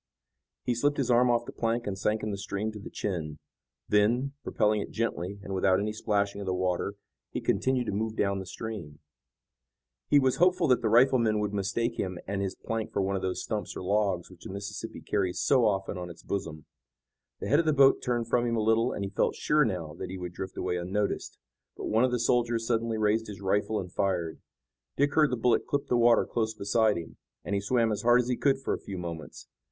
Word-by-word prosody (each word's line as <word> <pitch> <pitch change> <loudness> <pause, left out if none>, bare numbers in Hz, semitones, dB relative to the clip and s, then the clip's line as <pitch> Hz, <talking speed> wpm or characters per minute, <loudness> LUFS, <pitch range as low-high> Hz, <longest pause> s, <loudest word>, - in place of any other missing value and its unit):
He 125 - +1
slipped 145 +5 +1
his 130 -3 +1
arm 120 +1 +5
off 120 0 +2
the - - -7
plank 115 +1 -1
and 100 - -2
sank 105 +3 -1
in 110 - -2
the 100 - -3
stream 105 +1 -3
to 105 - -9
the 100 - -8
chin. 80 -7 -3 0.5
Then, 120 +7 +2
propelling 105 0 +1
it - - -6
gently 100 -4 -3
and 100 - -5
without 95 0 +3
any 105 +1 -1
splashing 100 -2 -1
of 100 - -6
the 95 - 0
water, 90 +2 -1 0.3
he - - -3
continued 130 -1 +1
to - - -2
move 110 +2 -2
down 100 -2 0
the 95 - -7
stream. 95 -8 -6 1.1
He 145 - +5
was 130 -2 +3
hopeful 180 -1 +4
that 125 -1 +4
the 110 - +1
riflemen 115 -2 +4
would 105 -1 -2
mistake 115 +4 -1
him 90 -2 -2
and 100 0 -2
his 95 -1 -2
plank 115 -1 -4
for - - -1
one 100 +1 0
of 95 - -2
those 95 -1 -2
stumps 105 -2 -4
or - - -5
logs 95 -2 0
which 90 -2 -15
the - - -8
Mississippi 100 +3 -6
carries 95 -3 -1
so 130 -4 +4
often 95 -2 -1
on 90 0 -6
its 85 - -12
bosom. 80 -6 -4 0.7
The - - -4
head 145 +5 +5
of 165 - +1
the - - +5
boat 135 -2 +5
turned 120 -2 -1
from 120 +1 +2
him 115 - 0
a 110 - +1
little, 115 +3 +3
and 100 - -3
he 95 - -6
felt - - +1
sure 150 0 +3
now 85 -8 -3
that - - -5
he 95 - -5
would 90 -1 -6
drift 95 +1 -6
away 90 -1 -1
unnoticed, 100 +4 -2 0.4
but - - -5
one 110 +3 +2
of 130 - +4
the 125 - 0
soldiers 115 -1 +1
suddenly 115 -1 0
raised 110 +1 +1
his 100 -3 -8
rifle 105 +2 0
and 90 -1 -7
fired. 90 -5 -1 0.6
Dick 145 0 +2
heard 155 -2 +4
the 125 - 0
bullet 120 +1 +2
clip 145 0 -1
the 125 - 0
water 120 -1 +5
close 110 -2 -2
beside 110 0 +2
him, 85 - -8 0.3
and - - -3
he 100 - +1
swam 115 +2 +2
as 105 -1 -2
hard 120 +2 +5
as 125 0 0
he 125 - +2
could 135 +2 +2
for 135 - -2
a - - -3
few 95 - -6
moments. 85 -3 -7
105 Hz, 230 wpm, -28 LUFS, 95-120 Hz, 1.1 s, arm